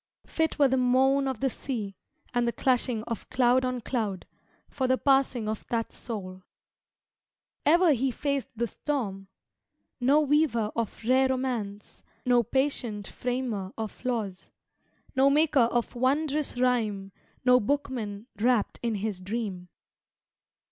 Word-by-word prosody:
Fit 320 -1 -1
were 285 -2 +5
the 265 0 +1
moan 265 +2 +3
of 260 -4 -3
the 270 - +2
sea 215 -8 -4 0.4
And 240 -1 +1
the - - +2
clashing 245 -3 +1
of 230 -2 -6
cloud 250 0 +3
on 255 -1 -2
cloud 215 -7 -2 0.4
For 265 -2 -2
the 260 0 +3
passing 270 -5 +2
of 215 0 -3
that 230 -1 -2
soul! 185 -5 -6 1.3
Ever 335 +1 +6
he 265 +1 +1
faced 280 +2 -2
the 235 +1 0
storm! 210 -6 -3 0.7
No 270 +4 +4
weaver 285 -7 +2
of 230 -1 -3
rare 260 +3 +4
romance, 235 -6 -3 0.2
No 245 -1 +5
patient 240 -4 -1
framer 245 -6 -3
of 220 +1 -6
laws, 220 -7 -3 0.7
No 265 +1 +5
maker 285 -4 +4
of 240 -1 -1
wondrous 280 +3 0
rhyme, 215 -6 0 0.3
No 250 0 +6
bookman 230 -5 -2
wrapt 235 -1 +1
in 235 -2 -1
his 200 -2 -3
dream. 190 -3 -4
245 Hz, 135 wpm, -28 LUFS, 215-265 Hz, 1.3 s, Ever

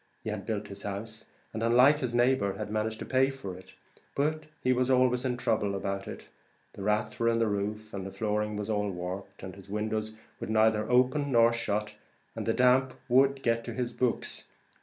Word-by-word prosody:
He - - -3
had - - -6
built 105 -1 -2
his 100 0 -8
house, 110 +3 -6 0.3
and, 110 - -4
unlike 125 +6 +5
his 125 -4 -2
neighbour, 120 -5 +3
had 105 +1 -5
managed 110 +1 -1
to - - -4
pay 130 +1 +3
for 135 -9 -7
it; 95 +1 -14 0.4
but 155 +2 0 0.2
he 130 - +4
was 125 +1 +1
always 125 -1 +3
in 125 -1 0
trouble 105 -4 0
about 100 0 -3
it; - - -8 0.5
the - - -9
rats 105 +1 0
were 115 0 +3
in 115 - +2
the 115 - +2
roof, 105 +1 -3
and 95 -1 -4
his 95 - -11
flooring 105 -1 -1
was 105 0 -4
all 105 -2 0
warped, 95 +2 -6
and 95 - -6
his 100 0 -14
windows 110 +1 -2 0.2
would - - -5
neither 110 0 +3
open 130 +3 +3
nor 115 -1 +5
shut, 105 -2 -2 0.4
and - - -4
the - - +4
damp 130 +1 +3
would 135 +2 +4
get 115 0 +1
to 120 - -5
his 120 -1 -2
books. 125 -1 -2
110 Hz, 205 wpm, -29 LUFS, 105-125 Hz, 0.5 s, unlike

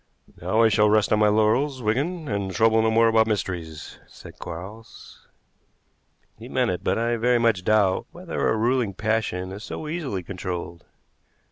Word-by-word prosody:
"Now 95 +7 +2
I 115 - +5
shall 105 0 +3
rest 105 0 +3
on 105 - +3
my 105 - +4
laurels, 115 +6 +1
Wigan, 150 +10 -1
and 100 -3 -2
trouble 110 +4 +3
no 110 - +2
more 115 +1 +4
about 110 0 +3
mysteries," 90 -7 -4
said - - -14
Quarles. 100 +7 -10 1.1
He - - -10
meant - - +1
it, - - -5
but - - 0
I 115 +1 0
very 120 +2 +2
much 115 -6 +1
doubt 100 -3 +2
whether 175 0 -3
a 110 - +1
ruling 115 -3 0
passion 105 -4 -2
is 100 +3 -8
so 155 - -6
easily 150 - -4
controlled. 90 -2 -6
110 Hz, 165 wpm, -24 LUFS, 95-115 Hz, 1.1 s, I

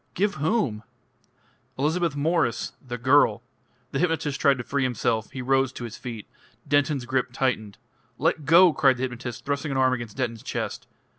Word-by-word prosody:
"Give 200 +2 +1
whom?" 145 - 0 1.0
"Elizabeth 160 +3 0
Mwres 145 -5 0
the 120 -2 -6
girl 125 -3 +3 0.2
" 125 +1 -40
The 135 - -2
hypnotist 160 -5 0
tried 140 -2 +4
to 120 - -5
free 140 +3 -1
himself; 120 -3 0
he 130 - -6
rose 135 0 +2
to 120 - -7
his 115 -2 -6
feet. 115 -4 -7 0.4
Denton's 145 -2 +1
grip 130 0 -1
tightened. 110 -6 -1 0.4
"Let 155 0 0
go!" 170 +3 +7
cried 135 -3 +3
the 125 - -3
hypnotist, 120 -2 -5
thrusting 140 +2 -2
an 135 - -1
arm 130 -1 +3
against 120 -3 -5
Denton's 115 -4 -2
chest. - - -4
130 Hz, 170 wpm, -25 LUFS, 120-145 Hz, 1.0 s, go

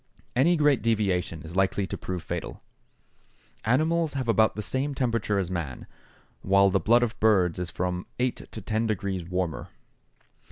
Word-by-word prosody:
Any 165 +8 +4
great 150 -3 +3
deviation 95 -8 0
is 80 +2 -9
likely 95 +1 +1
to - - -5
prove 90 -2 -5
fatal. - - -5 1.0
Animals 160 +6 +2
have 130 -3 -3
about 110 -1 +3
the 105 - -4
same 135 +8 -2
temperature 115 -5 0
as 95 -2 -1
man, 80 -8 -4 0.6
while 100 0 +4
the 95 - +3
blood 120 +7 +4
of 115 -2 -3
birds 95 -6 +3
is 90 -1 -3
from 90 0 -3
eight 125 0 -2
to - - -7
ten 110 0 -1
degrees 100 -3 -2
warmer. 90 -2 -3
105 Hz, 160 wpm, -27 LUFS, 90-120 Hz, 1.0 s, Any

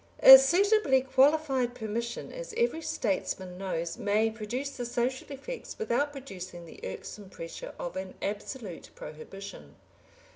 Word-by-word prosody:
A 265 0 +13
suitably 345 -1 +4
qualified 265 -1 +2
permission, 235 0 -4
as - - -7
every 470 -9 +1
statesman 185 - -2
knows, 170 -3 -3
may 215 +2 +2
produce 235 +6 -4
the 250 - -5
social 245 +4 -2
effects 465 - -7
without 290 - 0
producing 185 -11 -8
the 165 - -13
irksome 190 - -7
pressure 165 -3 -8
of 175 - -5
an 190 0 -5
absolute 205 - -5
prohibition. 155 - -10
235 Hz, 125 wpm, -29 LUFS, 190-275 Hz, -, A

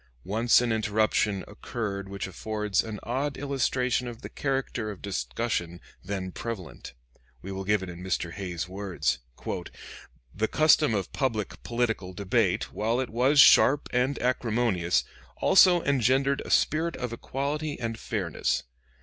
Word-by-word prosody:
Once 115 +5 +4
an 120 -1 0
interruption 105 -2 +1
occurred 105 -3 -5
which 100 0 -4
affords 105 +1 -1
an 110 -2 -6
odd 135 +4 -2
illustration 130 -2 0
of 120 -1 -8
the - - -6
character 135 -5 -2
of 100 -3 -7
discussion 95 -3 -3 0.2
then 95 -1 -4
prevalent. 100 - -7 0.5
We 100 - -6
will 95 0 -4
give 105 -1 +2
it 95 - -6
in 85 +1 -10
Mr. 90 -2 -2
Hay's 90 -2 -4
words: 90 -8 -2 1.1
"The 110 +3 0
custom 155 -4 +4
of 100 -3 -3
public 115 -6 -2
political 115 -6 -2
debate, 100 0 0
while 115 +4 0
it 130 - -2
was 130 +5 +3
sharp 145 0 +7
and 125 +3 +1
acrimonious, 115 -8 +1 0.3
also 180 -2 +6
engendered 135 +1 +2
a - - -9
spirit 160 +2 +2
of 125 -2 -4
equality 145 +5 -3
and 115 -2 -3
fairness. 95 -8 -1
110 Hz, 140 wpm, -27 LUFS, 95-130 Hz, 1.1 s, sharp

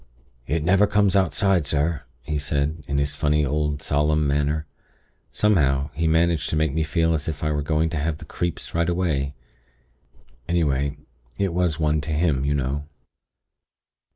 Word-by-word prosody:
"'It 75 +3 0
never 95 +5 +4
comes 100 -2 +2
outside, 95 -3 +2
sir,' 75 +2 0 0.2
he 75 +1 -2
said, 75 +2 -1
in 70 - -1
his 70 +1 0
funny, 75 +1 +1
old, 75 0 -1
solemn 75 +1 +1
manner. 75 +2 0 0.6
Somehow, 70 -9 +2
he 80 +4 0
managed 80 0 +2
to - - -1
make 80 -2 +1
me 80 - 0
feel 80 +1 +1
as 75 -2 -2
if 80 -2 -4
I 75 - +1
were 75 -1 0
going 80 +2 +1
to 85 - -2
have 75 +1 -1
the - - -11
'creeps' 85 -1 -4
right 85 +1 +1
away. 75 -6 -1 1.1
Anyway, 70 -4 0 0.4
it 95 0 0
was 85 -3 0
one 75 -1 +1
to 80 - -5
him, 75 -4 +1
you 70 +1 +1
know. 70 +1 -2
75 Hz, 165 wpm, -23 LUFS, 70-85 Hz, 1.1 s, never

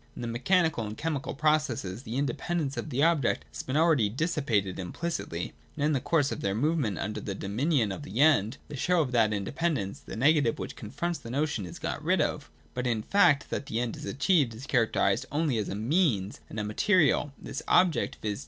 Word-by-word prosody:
In - - -6
the - - -2
mechani 170 +3 +3
cal 115 -5 -3
and 105 +1 -7
chemical 150 -4 -3
processes 140 -9 0
the 115 -2 -6
independence 145 +2 -1
of - - -4
the 135 +1 +1
object 160 -7 +2
has - - -5
been 130 +3 -2
already 155 -10 +4
dissipated 125 - -1
implicitly, 95 - -4 0.2
and 145 - -2
in 155 - +2
the 135 - +2
course 145 +1 +1
of - - -4
their 100 0 0
movement 135 - 0
under 105 +6 -3
the 100 - -4
dominion 115 - 0
of 95 - -5
the 105 +6 -6
End, 140 -5 +4
the 150 - -7
show 175 +5 +2
of 135 -5 -2
that 115 -3 +3
independence, 105 - -2
the - - -9
negative 140 0 +3
which - - -6
confronts 170 +11 -4
the 115 - -10
notion, 135 -7 -1
is 85 - -9
got - - -4
rid - - +2
of - - -1 0.2
But 125 - -2
in 115 -3 0
the - - -15
fact 145 -8 +4
that 140 - -3
the 110 - -2
End 120 -2 -2
achieved 130 - +1
is 125 +5 -9
characterised 125 -1 +1
only 145 -5 +1
as 105 - -2
a - - -3
Means 110 - +1
and 110 - -5
a - - -1
material, 150 - +2
this - - -6
object, 180 -3 +3
viz. 105 -1 -2
135 Hz, 210 wpm, -28 LUFS, 110-155 Hz, 0.2 s, already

